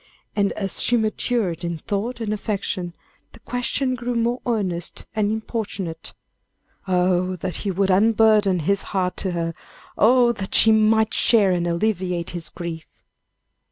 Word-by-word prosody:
And 200 Hz, -1 st, +2 dB
as 195 Hz, -2 st, -1 dB
she 240 Hz, -, +3 dB
matured 215 Hz, -5 st, -1 dB
in 170 Hz, -1 st, -3 dB
thought 210 Hz, +9 st, -3 dB
and 215 Hz, -2 st, -2 dB
affection, 195 Hz, -4 st, -3 dB, 0.4 s
the -, -, -14 dB
question 250 Hz, +2 st, -1 dB
grew 245 Hz, 0 st, -3 dB
more 235 Hz, +2 st, 0 dB
earnest 185 Hz, -7 st, -2 dB
and 210 Hz, -1 st, +1 dB
importunate. 205 Hz, -7 st, -4 dB, 0.7 s
Oh, 180 Hz, 0 st, +1 dB
that 180 Hz, -1 st, -4 dB
he 205 Hz, -, -3 dB
would 195 Hz, +1 st, +1 dB
unburden 210 Hz, -2 st, +4 dB
his 200 Hz, +5 st, +1 dB, 0.2 s
heart 180 Hz, -1 st, 0 dB
to 190 Hz, -, -2 dB
her; 165 Hz, -1 st, -2 dB, 0.5 s
oh! 240 Hz, +2 st, +5 dB
that 200 Hz, -4 st, -4 dB
she 225 Hz, -, +7 dB
might 220 Hz, 0 st, +3 dB
share 210 Hz, -5 st, +4 dB
and 175 Hz, -1 st, 0 dB
alleviate 180 Hz, -1 st, -1 dB
his 165 Hz, -2 st, -3 dB
griefs. 165 Hz, -2 st, -8 dB
200 Hz, 145 wpm, -22 LUFS, 180-220 Hz, 0.7 s, she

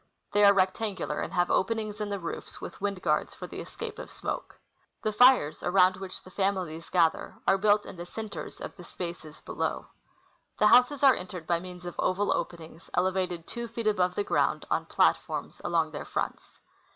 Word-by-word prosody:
They 205 Hz, -, +4 dB
are 200 Hz, -, +9 dB
rect 190 Hz, +1 st, +2 dB
angular, 190 Hz, -8 st, -2 dB
and -, -, -4 dB
have 175 Hz, -1 st, +2 dB
openings 215 Hz, 0 st, 0 dB
in 210 Hz, -, -2 dB
the 200 Hz, -, -2 dB
roofs, 170 Hz, -, -6 dB
with -, -, -8 dB
wind 200 Hz, -2 st, -2 dB
guards, -, -, +1 dB
for -, -, -7 dB
the -, -, -8 dB
escape 460 Hz, 0 st, -7 dB
of -, -, -7 dB
smoke. -, -, -5 dB, 0.5 s
The 215 Hz, -, +1 dB
fires, 245 Hz, -, +5 dB
around 185 Hz, 0 st, +4 dB
which 190 Hz, -1 st, -7 dB
the 185 Hz, -, -14 dB
families 185 Hz, -5 st, -2 dB
gather, 165 Hz, -3 st, +2 dB
are 195 Hz, -, +5 dB
built 205 Hz, +1 st, +4 dB
in 185 Hz, -, -9 dB
the 175 Hz, +1 st, -7 dB
centers 215 Hz, +1 st, -6 dB
of -, -, -7 dB
the 180 Hz, -, -10 dB
spaces 170 Hz, -3 st, -7 dB
below. -, -, -3 dB, 0.7 s
The 210 Hz, -, +3 dB
houses 250 Hz, +5 st, +5 dB
are 270 Hz, -2 st, +8 dB
entered 180 Hz, -4 st, -6 dB
by 170 Hz, 0 st, +1 dB
means 180 Hz, 0 st, -10 dB
of 175 Hz, -, -5 dB
oval 200 Hz, +2 st, +2 dB
openings, 165 Hz, -1 st, -6 dB
elevated 180 Hz, -2 st, 0 dB
tAVO 235 Hz, -1 st, -5 dB
feet 230 Hz, 0 st, -5 dB
above 185 Hz, -4 st, +2 dB
the 205 Hz, -, 0 dB
ground -, -, +1 dB
on -, -, 0 dB
platforms -, -, +1 dB
along 165 Hz, -2 st, +1 dB
their 145 Hz, -, -6 dB
fronts. -, -, -4 dB
185 Hz, 190 wpm, -28 LUFS, 175-210 Hz, 0.7 s, are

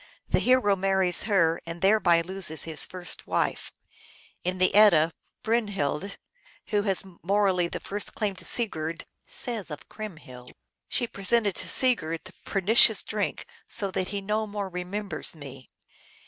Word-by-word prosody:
The -, -, +2 dB
hero 250 Hz, -6 st, +3 dB
marries 190 Hz, -1 st, +1 dB
her, 170 Hz, -5 st, +2 dB
and 165 Hz, +1 st, -6 dB
thereby 190 Hz, -4 st, +3 dB
loses 170 Hz, -4 st, 0 dB
his 160 Hz, -1 st, +2 dB
first 180 Hz, -1 st, -3 dB
wife. -, -, -2 dB, 0.7 s
In 180 Hz, +1 st, -2 dB
the 185 Hz, 0 st, +2 dB
Edda, 180 Hz, -6 st, +6 dB, 0.3 s
Brynhild, 200 Hz, -6 st, -2 dB, 0.5 s
who 210 Hz, -2 st, +1 dB
has 195 Hz, -2 st, +1 dB, 0.2 s
morally 190 Hz, -2 st, +1 dB
the -, -, -6 dB
first 205 Hz, +1 st, -2 dB
claim 205 Hz, -3 st, -2 dB
to 185 Hz, -, -10 dB
Sigurd, 165 Hz, -8 st, -2 dB, 0.2 s
says 230 Hz, -7 st, -6 dB
of 150 Hz, -, -9 dB
Crymhild, 155 Hz, -12 st, -9 dB, 0.2 s
" -, -, -60 dB
She 245 Hz, -, 0 dB
presented 205 Hz, 0 st, +3 dB
to -, -, 0 dB
Sigurd 165 Hz, -11 st, +2 dB
the 185 Hz, -, -13 dB
pernicious 205 Hz, +5 st, +5 dB
drink, -, -, -3 dB, 0.2 s
so 200 Hz, -3 st, 0 dB
that 185 Hz, 0 st, -2 dB
he 200 Hz, 0 st, -4 dB
no 215 Hz, +2 st, -2 dB
more 205 Hz, -1 st, -5 dB
remembers 185 Hz, +2 st, -3 dB
me." 135 Hz, -3 st, -11 dB
195 Hz, 145 wpm, -26 LUFS, 170-210 Hz, 0.7 s, Edda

